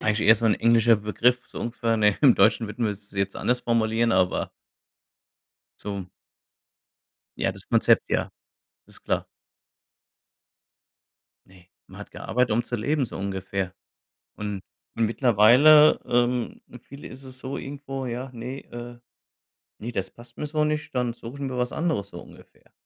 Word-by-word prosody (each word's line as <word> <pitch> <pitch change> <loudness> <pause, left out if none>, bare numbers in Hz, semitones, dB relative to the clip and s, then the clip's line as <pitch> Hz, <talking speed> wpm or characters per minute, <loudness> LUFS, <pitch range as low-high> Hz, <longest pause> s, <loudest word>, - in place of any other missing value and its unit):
eigentlich 110 0 0
eher 110 - +9
so 115 - -1
'n 110 - +4
englischer 115 0 +4
Begriff 110 +4 +1
so - - -9
ungefähr, 115 -1 -1
ne? 105 -2 +3
Im 135 -5 +6
Deutschen 110 +3 +3
würden 115 +3 -4
wir 105 - +1
es 105 +1 -12
jetzt 100 0 -2
anders 125 0 0
formulieren, 115 -1 +1
aber 95 -1 +1 1.3
so 100 -3 -5 1.3
Ja, - - 0
das - - -11
Konzept, - - +4
ja. - - 0 0.6
Ist - - -15
klar. - - -1 2.2
Ne, 90 -2 -20 0.2
man - - -13
hat - - -10
gearbeitet, 125 0 -1
um 115 +2 +2
zu 120 0 -4
leben, 140 +5 0
so - - -8
ungefähr. 95 -1 -4 0.6
Und 105 -2 -5 0.3
und 115 -1 +1
mittlerweile, 125 +7 +6
ähm, 120 0 0
für 125 - -11
viele 140 +4 -12
ist 130 +1 -11
es 130 -1 -7
so 130 +1 -5
irgendwo: 135 -1 -6
„Ja, 125 +2 -5
ne 125 +3 -7
äh, 120 0 -8 0.8
ne, 115 +3 -6
das 95 -5 -3
passt 120 0 -17
mir 150 - -4
so 155 +1 0
nicht, 150 -1 -3
dann 125 -2 0
suche 120 +2 -10
ich 140 - -9
mir 130 -2 -3
was 125 0 -1
anderes“, 155 - -2
so 85 - -9
ungefähr. - - -18
120 Hz, 160 wpm, -25 LUFS, 105-130 Hz, 2.2 s, eher